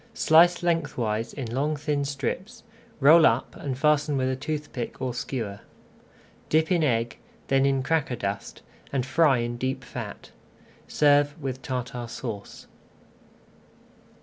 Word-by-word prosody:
Slice 175 +3 +5
lengthwise 130 -10 -1
in 125 -5 -6
long 145 +4 0
thin 145 -1 -1
strips, 145 - -4 0.4
roll 155 +4 +7
up 115 +3 0
and 135 -3 -4
fasten 150 0 +2
with 130 0 +1
a - - -1
toothpick 145 -3 -5
or 130 -2 -2
skewer. 115 -5 -4 0.9
Dip 160 +2 +2
in 175 -3 +3
egg, 115 -4 0 0.3
then 135 0 +3
in 135 -1 +1
cracker 145 -3 0
dust, 100 -2 -5 0.3
and 130 -3 -1
fry 145 -1 +3
in 120 0 -3
deep 130 +1 -2
fat. - - -8 0.6
Serve 145 +1 +3
with 130 -3 -4
Tartar 125 -1 -4
Sauce. 115 -3 -7
135 Hz, 130 wpm, -26 LUFS, 125-150 Hz, 0.9 s, roll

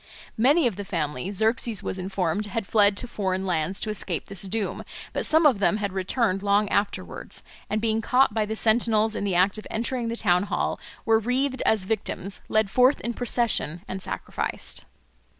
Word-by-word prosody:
Many 280 +7 +5
of 230 -6 0
the 205 - -4
family, 160 -3 -3
Xerxes 220 +2 +1
was 190 - -3
informed, 190 +1 -1
had 205 +1 -3
fled 205 -1 +3
to 245 - -1
foreign 190 -4 -2
lands 180 +1 -1
to 215 - -1
escape 185 -4 -3
this 195 -2 -6
doom; 200 +1 -3 0.3
but - - 0
some 315 +1 +4
of 260 -9 +5
them 205 +1 +2
had 200 -3 -3
returned 195 +1 0
long 205 +1 +2
afterwards, 200 0 -2 0.3
and 215 - 0
being 220 0 0
caught 255 0 +3
by 215 -1 0
the 220 - -3
sentinels 220 -1 +3
in - - -2
the 195 -3 0
act 190 +4 +3
of - - -10
entering 235 +1 -2
the 230 +1 -3
town 180 -3 +3
hall - - -1 0.3
were 225 -1 +4
wreathed 260 +4 0
as 215 -4 +2
victims, 195 -2 -3
led 215 -1 +2
forth 255 +5 +4
in 235 - -3
procession, 230 -8 0
and 190 0 -5
sacrificed. - - -3
210 Hz, 185 wpm, -25 LUFS, 190-230 Hz, 0.3 s, Many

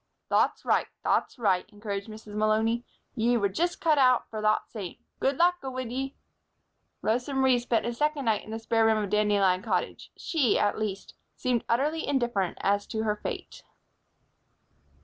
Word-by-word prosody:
"Thot's - - +2
right, - - +2 0.2
thot's - - +1
right," 200 -5 +1
encouraged 205 -1 -5
Mrs. 215 -1 -10
Malony. 220 +2 +1 0.3
"Ye 240 +1 +2
were 205 -3 +2
just 345 - -1
cut 310 -3 +3
out 255 -2 +4
for 215 -1 -4
thot 215 0 +2
same. 200 -6 -7 0.2
Good 270 0 +1
luck 355 +1 +3
go 270 - -4
wid 255 -2 -5
ye." 270 +2 -3 0.9
Rosa 245 +5 0
Marie 265 -2 +4
spent 240 -1 0
a 240 - -1
second 295 +2 0
night 220 -2 +1
in - - -13
the 220 - -3
spare 225 0 +1
room 220 0 +4
of 205 -2 -2
Dandelion 205 -3 +3
Cottage. 190 -5 -2
She, 280 -10 +1
at 205 - +1
least, 200 -3 -4 0.2
seemed 250 -3 0
utterly 295 +7 +1
indifferent 240 -9 0
as 200 +1 +1
to 220 0 -2
her 210 -1 +1
fate. 210 - -6
225 Hz, 170 wpm, -28 LUFS, 210-260 Hz, 0.9 s, out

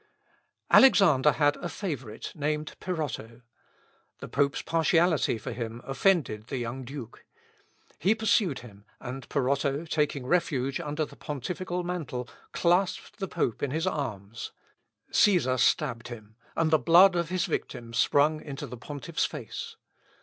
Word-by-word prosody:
Alexander 155 - +6
had 145 -1 +2
a 175 - -5
favourite, 135 - -5
named 150 0 -2
Peroto. 125 -9 -4 0.8
The - - -7
pope's 140 -1 0
partiality 165 -4 +2
for - - -6
him 115 -1 -5
offended 135 - +1
the 135 - -3
young 120 +2 -4
Duke. 130 -2 -9 0.8
He 195 +8 +3
pursued 210 - +1
him, 105 -4 -14
and 130 +1 -7
Peroto, 140 +2 0
taking 150 -4 -1
refuge 135 -4 0
under 150 -1 -2
the - - -14
pontifical 175 +5 -4
mantle, 155 -9 -4 0.2
clasped 180 +2 +1
the 195 - -2
pope 115 - -2
in 145 - 0
his 160 +5 -1
arms. 115 - -4 0.6
Cæsar 165 -11 +3
stabbed 125 -2 +1
him, 110 -3 -10 0.2
and 160 -1 +1
the 155 - +5
blood 175 +4 +6
of 170 -2 0
his 180 -1 0
victim 120 -3 -4
sprung 145 +5 +3
into 140 -2 -6
the 125 - -8
pontiffs 145 +6 -3
face. 135 -9 -7
145 Hz, 135 wpm, -28 LUFS, 125-170 Hz, 0.8 s, Alexander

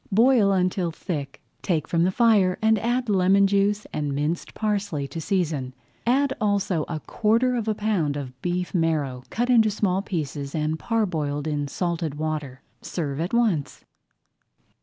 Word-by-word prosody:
Boil 225 -1 +5
until 185 -1 +1
thick, 150 -4 -5 0.2
take 160 -5 -1
from 170 0 +2
the 185 - +2
fire 205 -4 +3
and 220 -1 +3
add 245 +3 0
lemon 195 0 +4
juice 200 +1 +1
and 145 -2 -2
minced 150 +4 -2
parsley 200 -9 -1
to 160 +4 -6
season. 155 -9 -1 0.3
Add 270 +2 +3
also 200 -6 +1
a 160 -2 -4
quarter 230 +4 +1
of 230 -2 -2
a 215 - +1
pound 190 -9 0
of 130 -2 -7
beef 180 0 -2
marrow 155 -7 0
cut 245 +2 0
in 240 -2 +7
small 195 -2 0
pieces 145 -7 -4
and 155 0 -1
parboiled 160 -11 -1
in 145 -2 -1
salted 170 -1 -2
water. 150 -4 -4 0.2
Serve 145 -5 -4
at 175 - -2
once. 220 -12 0
180 Hz, 155 wpm, -24 LUFS, 150-210 Hz, 0.3 s, in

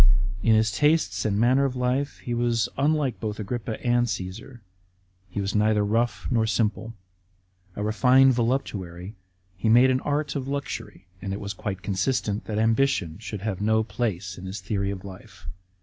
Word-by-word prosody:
In 110 +1 +4
his 110 -1 +3
tastes 105 - +2
and 100 -2 +1
manner 130 +4 +4
of 135 -2 0
life 125 +3 -1
he 120 - -2
was 120 -1 +1
unlike 145 -2 +1
both 105 -1 -4
Agrippa 110 +1 -4
and 120 0 +3
Cassar. 110 +5 -6 0.7
He 95 - -4
was 100 0 -2
neither 105 0 +3
rough 115 +3 0
nor 115 -2 +2
simple. 110 +1 -1 0.8
A 105 - -3
refined 130 +5 +5
voluptuary, 105 -7 -2 0.4
he 105 +4 -1
made 125 +3 +6
an 130 - +2
art 150 +1 -1
of 135 -2 -3
luxury; 140 -9 -5 0.2
and 95 0 -3
it 100 - -4
was 100 0 -4
quite 95 -2 -5
consistent 105 +1 -1
that 105 - -3
ambition 110 -7 +1
should 105 -3 -6
have 100 -2 -3
no 110 +1 +3
place 95 -4 -3
in 95 - -7
his 95 +2 -5
theory 100 +1 -2
of 100 -1 -5
life. 95 -2 -12
110 Hz, 170 wpm, -25 LUFS, 100-125 Hz, 0.8 s, made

